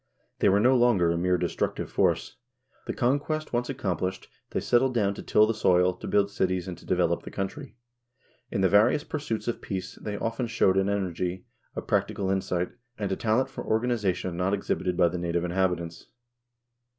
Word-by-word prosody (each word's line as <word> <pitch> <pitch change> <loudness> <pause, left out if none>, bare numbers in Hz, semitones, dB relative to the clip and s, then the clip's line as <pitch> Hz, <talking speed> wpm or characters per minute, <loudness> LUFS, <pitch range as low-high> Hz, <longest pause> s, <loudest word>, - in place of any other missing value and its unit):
They - - +4
were 100 +1 +4
no 125 +5 +5
longer 120 -9 +4
a - - 0
mere 90 +1 +2
destructive 85 -1 -2
force. - - +1 0.5
The - - -1
conquest 145 +5 0
once 120 0 0
accomplished, 95 - -3 0.2
they - - -1
settled 125 +1 +2
down 100 -3 +2
to - - -8
till 105 - +4
the 110 - 0
soil, 90 -3 +3
to - - -9
build 100 0 +2
cities, 95 -2 -1
and 90 - -4
to - - -16
develop - - +1
the - - -9
country. 130 +9 -5 0.7
In 95 - -1
the 95 - +5
various 105 +9 +4
pursuits 140 -8 -4
of 120 - -2
peace 95 -2 -4
they 105 -1 -4
often 115 +3 -2
showed 100 -4 +2
an 95 +1 +2
energy, 90 -2 -2 0.3
a - - -4
practical 95 -1 0
insight, 90 -2 -1 0.3
and 100 -2 -2
a - - +1
talent 115 +6 +1
for - - -6
organization 105 -6 0
not 90 +3 +1
exhibited 90 -2 -2
by 90 - +5
the 90 +1 -3
native 85 0 -1
inhabitants. 90 -2 -1
95 Hz, 185 wpm, -27 LUFS, 90-115 Hz, 0.7 s, no